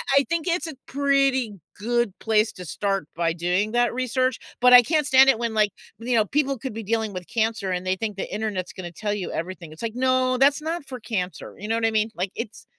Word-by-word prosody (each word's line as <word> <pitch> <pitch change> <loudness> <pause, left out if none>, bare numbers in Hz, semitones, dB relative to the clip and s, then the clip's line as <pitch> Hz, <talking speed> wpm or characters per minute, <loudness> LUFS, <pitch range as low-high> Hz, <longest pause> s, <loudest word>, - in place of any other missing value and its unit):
I - - +8
I - - +4
I - - -6
think 335 0 -1
it's 345 0 0
a 315 - -7
pretty 275 -4 +1 0.2
good 235 -1 0
place 220 0 +2
to 180 - -9
start 195 +3 -1
by 165 -1 0
doing 180 +5 0
that 240 0 +2
research, 255 0 0 0.2
but 250 0 +7
I 250 - +11
can't 305 +4 +1
stand 265 -1 +6
it 270 - +4
when, 230 -1 -2
like, 215 -1 +3 0.3
you 240 +1 -1
know, 220 -2 +4
people 275 +3 0
could 260 0 -6
be 225 +1 -5
dealing 220 0 -1
with 180 -1 -7
cancer 220 -4 -1
and 180 0 -2
they 185 0 +1
think 210 -1 -4
the 195 - -5
internet's 205 -4 -3
gonna 175 -2 -7
tell 205 +4 -3
you 205 -3 -4
everything, 170 -1 -5
it's 155 - -12
like, 225 0 -3
"No, 255 0 +2
that's 280 +3 +4
not 320 0 -3
for 260 -2 -7
cancer," 185 -7 -4
you 210 - -6
know 225 - +1
what 230 0 0
I 225 - +2
mean? 215 0 +1
Like, 185 +2 -2
it's 230 -2 -7
225 Hz, 250 wpm, -24 LUFS, 200-255 Hz, 0.3 s, I